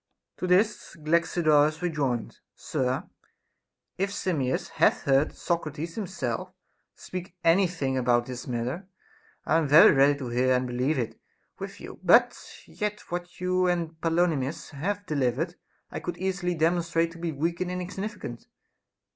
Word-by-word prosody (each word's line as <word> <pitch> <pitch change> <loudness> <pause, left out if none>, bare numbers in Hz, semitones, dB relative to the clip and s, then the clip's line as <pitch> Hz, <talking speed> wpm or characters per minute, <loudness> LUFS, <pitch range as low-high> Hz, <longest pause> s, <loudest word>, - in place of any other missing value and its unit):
* - - -58
To 185 - -3
this 200 +4 +2
Galaxidorus 155 -1 +2
rejoined: 140 -9 -1 0.2
Sir, 130 0 -2 0.9
if 195 +1 +1
Simmias 155 -10 -1
hath - - +2
heard 140 +2 +3
Socrates 165 -1 -3
himself 170 - -3 0.4
speak 185 0 -7
any 180 +3 +5
thing 135 -7 -2
about 120 -1 +2
this 125 -1 -7
matter, 125 +9 -3 0.6
I 160 - +3
am 160 - 0
very 150 +4 +8
ready 140 +1 +4
to 130 -4 -5
hear 130 +2 +2
and 125 0 0
believe 125 +5 0
it 115 -3 -3 0.4
with - - -7
you; - - -10
but - - +5 0.3
yet 210 0 -4
what 175 0 -5
you 185 0 +1
and 170 -2 0
Polymnis 165 -4 0
have 200 +8 -3
delivered 145 +2 0 0.4
I - - -4
could 175 - -5
easily 180 -1 -1
demonstrate 165 0 +1
to 165 - -12
be 170 -1 -2
weak 165 +4 -2
and 180 - -1
insignificant. 180 - -5
165 Hz, 145 wpm, -27 LUFS, 135-180 Hz, 0.9 s, very